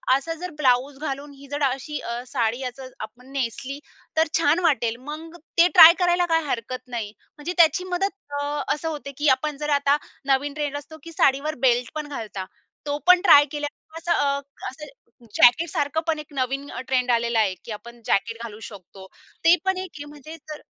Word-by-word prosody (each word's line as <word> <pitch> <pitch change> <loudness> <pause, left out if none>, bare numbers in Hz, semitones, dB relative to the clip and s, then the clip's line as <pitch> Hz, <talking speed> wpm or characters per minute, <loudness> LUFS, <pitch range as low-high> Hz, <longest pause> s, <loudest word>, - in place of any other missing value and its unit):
असा 330 +5 -2
जर 360 - -4
ब्लाउज 265 0 +2
घालून 285 -1 -5
ही 280 0 -14
जर 290 +1 -3
अशी 295 +3 -5
अ, 235 +1 -4
साडी 240 -2 -1
याचं 255 +1 -6
आपण 245 +5 -10
नेसली, 275 +1 -3 0.4
तर 320 - +4
छान 320 +2 +3
वाटेल. 235 -8 +2
मग 325 +2 -7 0.2
ते 340 +1 +7
ट्राय 335 -2 +11
करायला 355 0 +3
काही 325 -1 +2
हरकत 250 +1 -4
नाही. 225 -4 -4 0.3
म्हणजे 330 +5 -4
त्याची 335 +2 +5
मदत 390 +3 0 0.3
अ, - - -2 0.3
असं 310 +2 -5
होते 290 -2 -6
की 295 +1 0
आपण 300 -2 -4
जर 300 0 -4
आता 280 +1 +3 0.3
नवीन 275 +1 +1
ट्रेंड 290 -1 -3
असतो 295 +2 -10
की 335 - -9
साडीवर 300 0 +2
बेल्ट 245 -1 +2
पण 300 -1 -4
घालता. 215 -9 -6 0.4
तो 290 0 -1
पण 360 0 +7
ट्राय 290 -6 +8
केल्या 295 -1 -3 0.3
असं 335 +1 -3 0.6
असं 300 +4 -10 0.5
जॅकेट 305 +8 +5
सारखं 310 -1 -1
पण 315 -2 0
एक 300 - -7
नवीन 270 +2 -2
अ, - - -6
ट्रेंड 250 -1 +1
आलेला 235 -1 +1
आहे 200 -3 +2
की 230 - -7
आपण 235 +3 -9
जॅकेट 230 +3 0
घालू 220 -2 -8
शकतो. 190 -1 -13 0.4
ते 340 +2 +8
पण 380 -1 +1
एक 375 -1 -5
आहे. 290 - -7
म्हणजे 295 +2 -11
जर 300 - -7
285 Hz, 190 wpm, -24 LUFS, 245-315 Hz, 0.6 s, ट्राय